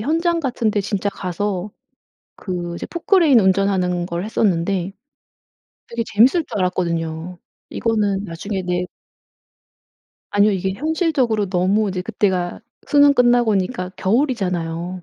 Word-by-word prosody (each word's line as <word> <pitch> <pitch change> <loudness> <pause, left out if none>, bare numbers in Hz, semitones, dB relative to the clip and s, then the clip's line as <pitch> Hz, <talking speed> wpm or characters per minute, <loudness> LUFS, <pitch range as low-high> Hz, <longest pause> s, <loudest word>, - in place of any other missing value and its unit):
현장 330 +7 0
같은데 235 -7 0
진짜 200 0 -2
가서 195 +1 -3 0.7
그 175 -3 -5
이제 - - -6
포클레인 335 - +3
운전하는 190 -2 +1
걸 175 +1 -4
했었는데 195 -3 0 1.0
되게 235 0 -2
재밌을 260 - +4
줄 210 - -5
알았거든요. 170 -1 -2 0.3
이거는 205 -3 0
나중에 190 +3 -4
네 180 0 -1 1.4
아니요. 205 +1 +4
이게 190 0 -1
현실적으로 280 - 0
너무 195 +4 +1
이제 185 -1 -3
그때가 190 -4 -1 0.3
수능 285 -1 +5
끝나고니까 240 -6 +2
겨울이잖아요. 185 - -1
200 Hz, 290 characters per minute, -20 LUFS, 180-235 Hz, 1.4 s, 수능